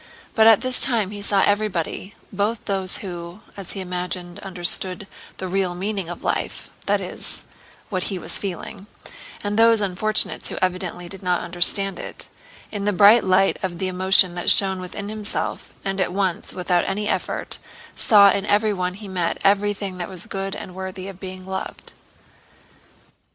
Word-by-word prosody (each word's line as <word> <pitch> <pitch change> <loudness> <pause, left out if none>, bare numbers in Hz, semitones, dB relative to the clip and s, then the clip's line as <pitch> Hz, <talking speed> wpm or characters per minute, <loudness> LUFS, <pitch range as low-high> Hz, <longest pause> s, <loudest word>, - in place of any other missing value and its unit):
But 220 -1 +5
at 225 -2 +7
this 255 0 +1
time 225 -7 +3
he 205 -1 -6
saw 200 -1 +2
everybody—both 205 +2 -1
those 190 -2 0
who, 175 +2 -7
as 195 -3 -5
he 195 - -4
imagined, 180 0 -4
understood 185 0 +1 0.3
the 190 - -4
real 185 -1 0
meaning 195 -1 -3
of 175 - -7
life - - -2 0.2
(that - - +3
is, - - -3 0.5
what 185 -3 -1
he 195 - -2
was - - -3
feeling) 195 +1 -6 0.6
and 205 +1 -1
those 230 -1 +6
unfortunates 205 +2 0
who - - -6
evidently 180 -1 -2
did 190 +1 -5
not 180 -2 0
understand 180 +2 +1
it—in 205 -2 -5
the 205 - +3
bright 210 +4 +7
light 190 +1 +3
of 185 -3 -3
the 190 - -1
emotion 185 0 +5
that 175 0 +2
shone 190 -2 +6
within 190 +2 -6
himself, 215 0 -1
and 195 0 -1
at 185 - 0
once 190 -2 -1
without 180 -1 0
any 210 +2 -2
effort - - -2 0.4
saw 200 -3 +6
in 200 - -1
everyone 205 -4 +1
he 205 +1 -10
met 180 -3 -1
everything 200 -1 +1
that 175 - -4
was 185 -3 -6
good 195 0 -4
and 185 - -8
worthy 190 0 -6
of 190 -2 -11
being 185 -1 -8
loved. 190 0 -5
190 Hz, 160 wpm, -22 LUFS, 180-205 Hz, 0.6 s, at